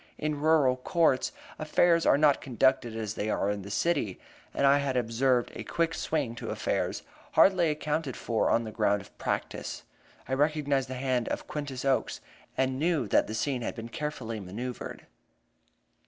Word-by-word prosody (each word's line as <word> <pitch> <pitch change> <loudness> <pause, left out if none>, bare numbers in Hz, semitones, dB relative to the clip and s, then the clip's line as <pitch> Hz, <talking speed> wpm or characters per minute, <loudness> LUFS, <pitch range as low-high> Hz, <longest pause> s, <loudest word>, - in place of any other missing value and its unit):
In 150 -1 -2
rural 150 -5 +4
courts, 145 0 +2 0.3
affairs 165 +2 +3
are - - +6
not 145 -1 +4
conducted 130 -2 +1
as 110 -2 -3
they 110 0 -3
are 100 -1 +1
in 105 -1 -3
the 100 - -9
city, 125 - 0 0.3
and 140 - +1
I 140 +1 +6
had 135 -2 -1
observed 120 +1 +1
a - - -6
quick 165 -1 0
swing 140 -9 -1
to - - -5
affairs, - - -1 0.3
hardly 185 -4 +5
accounted 150 -2 -2
for 115 -2 0
on 115 - +3
the 110 - -6
ground 105 -2 +1
of - - -19
practice. - - -3 0.4
I 130 - -2
recognized 145 -2 +1
the 130 - -4
hand 125 -2 0
of - - -3
Quintus 140 -3 -5
Oakes, 135 -1 +1 0.4
and 130 0 +1
knew 155 -6 +1
that - - +3
the 110 - -4
scene 130 +2 -1
had - - -3
been 115 0 -7
carefully 120 -5 -4
manoeuvred. 115 +7 -6
130 Hz, 170 wpm, -29 LUFS, 115-150 Hz, 0.4 s, are